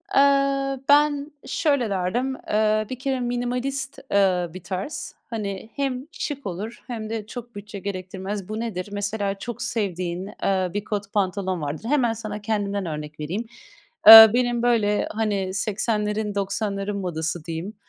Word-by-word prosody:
Eee, 275 -1 +3
ben 290 0 +4
şöyle 280 -8 +1
derdim, 205 +8 -1
eee, 215 0 +2
bir 255 - -5
kere 265 -1 -1
minimalist, 250 +3 -2
eee, 185 -3 +3
bir 185 -1 -9
tarz. 195 +10 -5
Hani 210 -2 -4
hem 270 -1 -2
şık 285 -6 -5
olur 200 +6 -6
hem 220 -3 -5
de 225 -2 -4
çok 240 +1 -9
bütçe 205 0 -8
gerektirmez. 190 +1 -5
Bu 215 +1 -3
nedir? 205 -5 -4
Mesela 205 -1 -2
çok 240 +1 -6
sevdiğin, 190 -6 -2 0.2
eee, 190 -2 +1
bir 205 0 -2
kot 205 -1 -4
pantolon 190 -3 0
vardır. 150 +6 -4
Hemen 255 -6 +2
sana 215 -1 -6
kendimden 205 -2 -1
örnek 150 -1 -6
vereyim: 180 +10 -3 0.6
Eee, 220 0 +14
benim, 240 -1 +1
böyle, 215 -4 +2
hani, 205 -4 -1
80'lerin 210 0 -1
90'ların 200 0 -2
modası 165 -3 -3
diyeyim, 165 +5 -5
210 Hz, 145 wpm, -24 LUFS, 195-240 Hz, 0.6 s, Eee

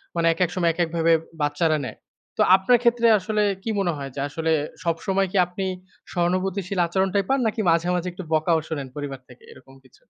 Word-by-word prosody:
মানে 165 0 +2
একেক 180 0 0
সময় 175 -2 +2
একে 175 - -3
এককভাবে 165 0 +2 0.3
বাচ্চারা 150 +2 +1
নেয়। 110 - -7 0.4
তো - - +1
আপনার 195 +6 +4
ক্ষেত্রে 235 -1 +3
আসলে 210 +2 0 0.2
কি - - -3
মনে 180 -3 +1
হয় 140 -1 -6
যে, - - -5
আসলে 160 +2 -2 0.3
সবসময় 190 +3 0
কি 200 - -1
আপনি 185 +2 -5 0.5
সহানুভূতিশীল 185 +2 -1
আচরণটাই 190 +2 0
পান 270 - +2
নাকি 220 0 -1
মাঝে, 165 +1 +2
মাঝে 180 +1 -2
একটু 180 +1 -8
বকাও 160 +1 +2
শোনেন 145 -4 -4
পরিবার 140 -2 -5
থেকে 125 - -17
এরকম 135 +1 -16
কিছু? 130 - -22
175 Hz, 190 wpm, -23 LUFS, 160-195 Hz, 0.5 s, আপনার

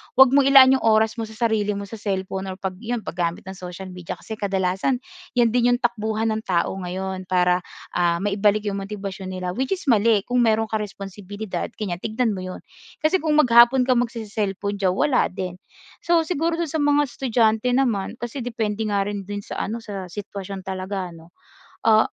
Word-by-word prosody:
huwag 265 0 +8
mong 275 0 +5
ilaan 265 -1 +8
'yong - - -5
oras 220 +1 +3
mo 225 - -2
sa 220 - -12
sarili 215 -3 +1
mo 200 - -4
sa 210 +2 -9
cellphone 190 -1 -3
or 190 - -4
'pag 185 -1 -5
'yon 235 0 -3
paggamit 170 -1 -2
ng 190 - -7
social 185 0 -8
media, 180 -2 -6
kasi 220 -1 -8
kadalasan 195 +4 0 0.4
'yan 240 -2 +4
din 245 +1 +3
'yong - - -5
takbuhan 220 -1 0
ng 220 0 -2
tao 175 -3 +1
ngayon 185 +1 -4
para, 180 -1 +3 0.3
ah, 175 -1 +2
maibalik 205 +1 +2
'yong 200 -1 -2
motibasyon 195 -1 -6
nila, 180 -1 -3
which 260 - -1
is 375 - -11
mali 220 -2 +4
kung 250 +2 0
meron 225 -2 +2
ka 220 - 0
responsibilidad 205 0 -5
ganiyan, 180 -5 -2
tignan 225 +5 -1
mo 185 - -5
'yon. 185 - -7 0.4
Kasi 310 +5 +3
kung 315 -3 0
maghapon 240 0 +6
ka 250 0 +3
magsese-cellphone 210 -4 -2
diyan, 190 -2 +1
wala 270 +6 +2
din. 180 -1 -5 0.5
So, 340 -1 +4
siguro 330 0 -1
do'n 335 -1 -2
sa 320 - -2
mga 290 -1 +3
estudyante 240 -1 +1
naman, 240 -7 +1
kasi 240 +3 -5
depende 220 -2 -2
nga 205 -2 +1
rin 200 0 -3
do'n 205 +1 -5
sa - - -7
ano 230 +3 -4
sa 200 -4 -6
sitwasyon 195 +1 -7
talaga 190 0 -4
ano. 165 0 -15 0.5
Ah, 220 0 +7
210 Hz, 190 wpm, -23 LUFS, 190-240 Hz, 0.5 s, huwag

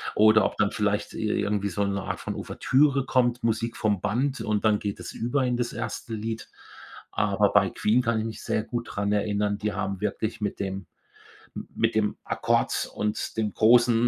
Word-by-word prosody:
oder 110 0 +6
ob - - -2
dann 105 0 +2
vielleicht 105 -1 -1
i 110 - -2
irgendwie 105 -1 0
so 100 +3 -1
'ne 100 -1 -1
Art - - -4
von - - -4
Ouvertüre 135 0 +2
kommt, 125 -2 +1
Musik 115 +1 -1
vom 105 -4 +1
Band 130 +7 0
und 105 0 -1
dann 105 -1 +4
geht 100 -2 -4
es - - -7
über 130 +3 0
in 125 - +1
das 120 -1 -1
1. 115 0 -5
Lied. 110 +1 -4 0.6
Aber - - +2
bei - - +5
Queen 115 +4 +2
kann 115 -2 0
ich 110 - -2
mich 110 -1 -6
sehr 110 - 0
gut 120 0 -4
dran 100 0 -1
erinnern, 105 0 0
die 105 0 -2
haben 95 0 -3
wirklich 110 +2 -2
mit 105 - -2
dem 95 -1 -4 0.7
m - - -5
mit 115 0 +1
dem 105 -1 +1
Akkord - - 0
und 105 +1 -2
dem 110 -2 0
großen 120 +2 +5
110 Hz, 195 wpm, -26 LUFS, 105-115 Hz, 0.7 s, oder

